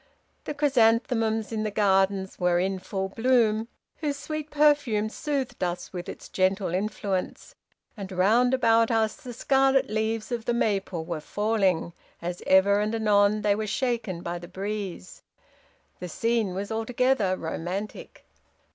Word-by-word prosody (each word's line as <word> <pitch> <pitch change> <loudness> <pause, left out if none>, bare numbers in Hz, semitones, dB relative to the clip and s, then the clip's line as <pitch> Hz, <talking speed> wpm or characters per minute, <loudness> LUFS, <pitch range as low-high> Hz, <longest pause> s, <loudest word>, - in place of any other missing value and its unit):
The 300 - -4
chrysanthemums 225 -5 +2
in 220 -1 -2
the 215 - -1
gardens 195 -2 +1
were 180 -1 +2
in 190 +1 0
full 190 +1 -4
bloom, 225 -1 +2 0.3
whose 290 -3 -2
sweet 310 0 -5
perfume 290 -8 +2
soothed 275 -4 -3
us 175 +1 -3
with 175 -1 -6
its - - -9
gentle 190 -1 0
influence; 195 -1 -3 0.4
and 200 -3 -7
round 225 +8 +3
about 230 -2 +3
us 220 -2 +1
the 250 - -9
scarlet 270 0 +2
leaves 220 +1 -1
of 235 -2 -3
the 240 - 0
maple 195 -7 -1
were 165 -2 -4
falling, 195 -3 0 0.3
as 175 +1 -5
ever 200 +2 +5
and 210 +2 -1
anon 210 -1 +3
they 205 -1 +3
were 215 +1 -3
shaken 220 -7 -2
by 175 0 -4
the 175 - -10
breeze. 195 - -6 0.8
The 180 - -6
scene 225 -1 0
was 200 +3 -4
altogether 225 -3 +1
romantic. 180 +5 -5
215 Hz, 145 wpm, -26 LUFS, 190-235 Hz, 0.8 s, ever